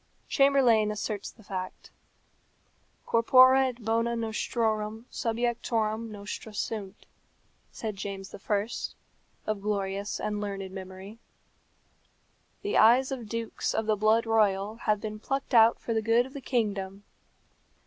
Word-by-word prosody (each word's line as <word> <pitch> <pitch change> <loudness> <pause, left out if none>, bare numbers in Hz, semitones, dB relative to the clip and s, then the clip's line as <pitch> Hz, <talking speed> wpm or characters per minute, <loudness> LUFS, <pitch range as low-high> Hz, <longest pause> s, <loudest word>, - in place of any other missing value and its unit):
Chamberlayne 260 -6 +4
asserts 210 -1 -3
the 220 - -18
fact. 185 -2 -6 1.1
Corpora 255 +3 +6
et 245 -3 -7
bona 230 +1 +1
nostrorum 220 -1 -1
subjectorum 230 -1 -1
nostra 210 +1 -7
sunt, 205 -2 -4 0.7
said 215 -3 -5
James 195 0 -6
I., 205 +1 -1 0.8
of 215 -2 -2
glorious 200 -1 -2
and 210 -1 -2
learned 195 -2 -4
memory. 190 +3 -9 1.4
The 410 - 0
eyes 245 +5 +6
of 240 -5 -5
dukes 230 0 -3
of 220 - 0
the 215 0 +2
blood 215 +2 +3
royal 210 -1 +2
have 215 -2 0
been 215 0 -6
plucked 270 +4 -3
out 230 -1 +6
for 230 - -3
the 220 - +1
good 230 +2 +3
of 265 - -12
the 280 - -7
kingdom. 205 -6 -2
220 Hz, 125 wpm, -28 LUFS, 205-230 Hz, 1.4 s, Corpora